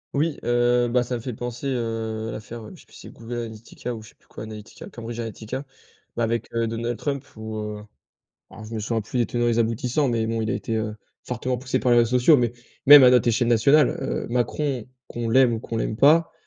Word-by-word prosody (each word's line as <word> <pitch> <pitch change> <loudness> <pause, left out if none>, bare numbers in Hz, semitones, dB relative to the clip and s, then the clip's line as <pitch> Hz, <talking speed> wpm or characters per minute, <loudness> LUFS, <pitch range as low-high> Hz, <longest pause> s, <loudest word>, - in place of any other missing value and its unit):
Oui, 150 +2 0
heu, 120 0 +2
bah, 125 +1 +2
ça 125 +1 -3
me 120 - -5
fait 125 +1 -5
penser, 120 +3 -6
heu, 115 -4 -2
à - - -4
l'affaire, 115 +1 -8
heu, - - -10
je - - -16
sais - - -21
plus - - -24
si - - -13
c'est - - -9
Google 115 +1 -9
Analytica 115 +1 -6
ou 110 - -9
je 110 - -13
sais - - -23
plus - - -33
quoi, - - -9
Analytica, 110 -1 -10
Cambridge 115 0 -7
Analytica, 115 +4 -5 0.5
bah - - -2
avec, 115 0 -2
heu, 115 0 0
Donald 115 +1 -3
Trump 140 -1 -3
où 110 0 -6
heu, 105 -1 -5 0.7
alors 110 - -11
je 110 +2 -8
me 110 - -2
souviens 110 +1 -1
plus 110 +4 -4
les 120 - +2
tenants 120 0 -1
et - - +3
les 115 0 +1
aboutissants, 120 +5 +1
mais 115 -2 0
bon, 115 0 -1
il 110 - -2
a - - 0
été, 115 -2 -3
heu, 110 -1 -2 0.3
fortement 125 +1 -2
poussé 130 +1 -1
par 125 - +2
les 120 - +6
réseaux 120 +2 +3
sociaux 145 +4 +6
mais 120 -2 +1 0.3
même 145 -1 +11
à 125 - +8
notre 125 -1 +4
échelle 120 +1 +2
nationale, 130 +5 +5
heu, - - -3
Macron 125 0 -1 0.2
qu'on 120 -1 -4
l'aime 125 +1 +5
ou 110 - -4
qu'on 115 - -5
l'aime 110 -1 -2
pas. 155 +5 +5
120 Hz, 250 wpm, -24 LUFS, 110-125 Hz, 0.7 s, même